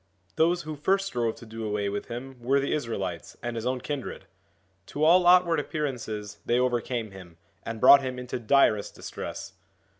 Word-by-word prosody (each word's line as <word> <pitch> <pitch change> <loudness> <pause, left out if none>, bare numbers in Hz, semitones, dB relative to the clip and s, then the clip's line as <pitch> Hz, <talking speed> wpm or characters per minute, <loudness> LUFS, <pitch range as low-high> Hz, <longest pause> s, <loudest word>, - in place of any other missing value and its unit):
Those 170 +2 +2
who 155 0 -6
first 195 +7 +1
strove 120 -10 -1
to - - -13
do 110 0 -7
away 105 -1 -1
with 100 +1 -4
him 125 +2 -7
were 135 +4 +2
the 140 - -1
Israelites 100 - -4
and 120 -1 -3
his 115 +1 -3
own 130 0 -1
kindred. 145 -1 -5 0.6
To 150 - -3
all 175 +3 +6
outward 175 -3 +5
appearances 120 -9 -4
they 120 - +1
overcame 120 -3 -1
him, 90 -4 -13 0.2
and 115 -1 -6
brought 140 +3 +8
him 130 -1 -4
into 125 0 -5
direst 110 -4 +2
distress. - - -7
125 Hz, 175 wpm, -27 LUFS, 110-145 Hz, 0.6 s, brought